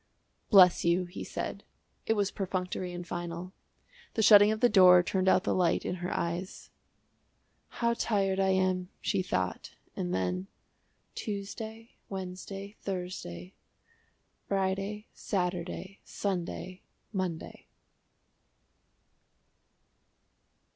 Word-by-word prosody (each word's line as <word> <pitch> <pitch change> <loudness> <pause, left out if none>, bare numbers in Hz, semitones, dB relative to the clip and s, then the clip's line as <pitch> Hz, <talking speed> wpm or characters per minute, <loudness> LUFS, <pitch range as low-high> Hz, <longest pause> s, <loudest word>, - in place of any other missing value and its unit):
"Bless 185 -4 +7
you," 170 +2 +2
he 175 +2 -7
said. - - -5 0.4
It 225 - +4
was 205 -2 0
perfunctory 185 -2 -3
and 175 0 -6
final. 175 +1 -5 0.6
The 220 - +2
shutting 205 0 +8
of 215 - -1
the 245 - +6
door 185 -5 +7
turned 190 +1 +1
out 185 - +4
the - - +1
light 180 -2 +2
in - - -1
her 180 - -2
eyes. 170 +2 -3 1.0
"How 235 0 0
tired 195 -4 0
I 190 0 +3
am!" 185 -1 +1
she 195 - 0
thought, 95 - -3 0.2
and 90 - -3
then 90 0 -1 0.7
"Tuesday, 220 +2 -6 0.2
Wednesday, 195 +2 -6
Thursday 180 - -5 0.9
Friday, 195 +2 -1
Saturday, 180 0 -3
Sunday, 185 -1 -4 0.3
Monday." 185 -4 -4
185 Hz, 105 wpm, -30 LUFS, 175-200 Hz, 1.0 s, shutting